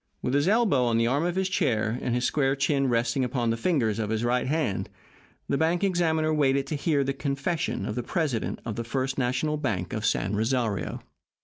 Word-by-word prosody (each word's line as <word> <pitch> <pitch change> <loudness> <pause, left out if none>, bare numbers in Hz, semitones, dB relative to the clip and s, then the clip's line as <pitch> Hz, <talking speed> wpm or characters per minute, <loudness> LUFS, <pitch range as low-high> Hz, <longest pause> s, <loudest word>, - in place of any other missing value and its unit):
With 125 - -1
his 145 +4 +2
elbow 205 - +3
on 115 -1 +2
the 115 - +3
arm 140 +7 +1
of 175 0 -1
his 190 0 +1
chair, 120 - 0
and 120 - -1
his 125 - 0
square 135 -2 +1
chin 135 0 +1
resting 120 +2 +1
upon 120 -2 0
the - - +1
fingers 115 - 0
of 105 -2 -2
his 110 +1 -1
right 125 +1 +1
hand, 145 - -1 0.6
the 140 - 0
bank 170 +3 +1
examiner 160 -4 +1
waited 140 -2 +2
to 150 - -3
hear 145 -1 +1
the 135 0 -1
confession 140 - -2
of 105 - -3
the 125 - -2
president 135 -2 -2
of 115 -3 -4
the 115 - -2
First 130 +3 -2
National 130 +5 0
Bank 105 -12 -2
of 110 - -3
San 100 -1 0
Rosario. 110 - -1
135 Hz, 210 wpm, -26 LUFS, 115-155 Hz, 0.6 s, elbow